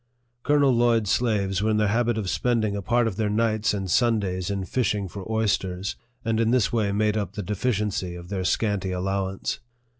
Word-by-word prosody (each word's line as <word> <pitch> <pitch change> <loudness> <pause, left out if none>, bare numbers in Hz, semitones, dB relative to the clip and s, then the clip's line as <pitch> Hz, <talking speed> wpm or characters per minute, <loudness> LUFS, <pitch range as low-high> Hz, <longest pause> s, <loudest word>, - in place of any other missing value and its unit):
Colonel 145 0 +3
Lloyd's 115 -3 +2
slaves 100 -5 +1
were 110 - +1
in 110 - +2
the 105 -1 +2
habit 115 +1 +1
of 105 -4 -2
spending 110 0 0
a 100 - -3
part 120 +2 +2
of 105 -4 -2
their 110 -2 0
nights 110 0 +1
and 100 -2 -3
Sundays 100 -3 +1
in 100 -2 -2
fishing 105 -2 0
for 100 +3 -7
oysters, 95 -4 -1 0.3
and 115 -1 +1
in 115 -1 +2
this 120 -4 +2
way 105 -4 +1
made 105 +1 +1
up 100 -3 -3
the 105 - -4
deficiency 105 -3 -1
of 85 0 -10
their 95 -2 -2
scanty 100 -1 0
allowance. 95 +1 -2
105 Hz, 190 wpm, -25 LUFS, 95-115 Hz, 0.3 s, Colonel